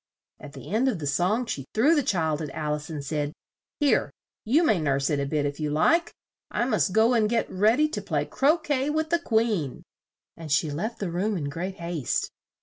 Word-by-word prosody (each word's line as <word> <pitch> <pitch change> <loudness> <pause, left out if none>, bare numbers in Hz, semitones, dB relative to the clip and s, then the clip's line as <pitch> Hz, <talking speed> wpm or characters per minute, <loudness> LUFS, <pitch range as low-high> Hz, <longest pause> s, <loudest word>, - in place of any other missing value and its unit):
At 145 -1 -11
the 135 +1 -10
end 230 +6 +2
of 245 -7 +1
the 155 - -5
song 180 - +1
she 140 - -5
threw 265 +9 +5
the 300 - +3
child 160 - 0
at 150 - -4
Al 150 -1 -1
ice 150 +1 -5
and 150 -3 -5
said, 145 0 -2 0.5
"Here, 290 -2 +2 0.4
you 280 +10 +3
may 215 - +3
nurse 140 -1 +1
it 145 - +1
a 140 - -1
bit 150 0 0
if 145 +1 -3
you 150 -1 -1
like; 325 - +2 0.4
I 240 - 0
must 215 -5 +1
go 220 +5 +4
and 220 -3 +2
get 235 0 +1
read 210 +6 +3
y 305 - +4
to 315 - -4
play - - -1
cro 295 +5 +2
quet 295 -3 -1
with 315 +1 -1
the 340 - +3
Queen," 220 - 0 0.5
and 160 -3 -8
she 155 0 +2
left 215 +11 -3
the 195 -4 -3
room 195 +4 -1
in 145 -4 -3
great 180 +6 -4
haste. 170 -6 -2
185 Hz, 225 wpm, -26 LUFS, 150-240 Hz, 0.5 s, threw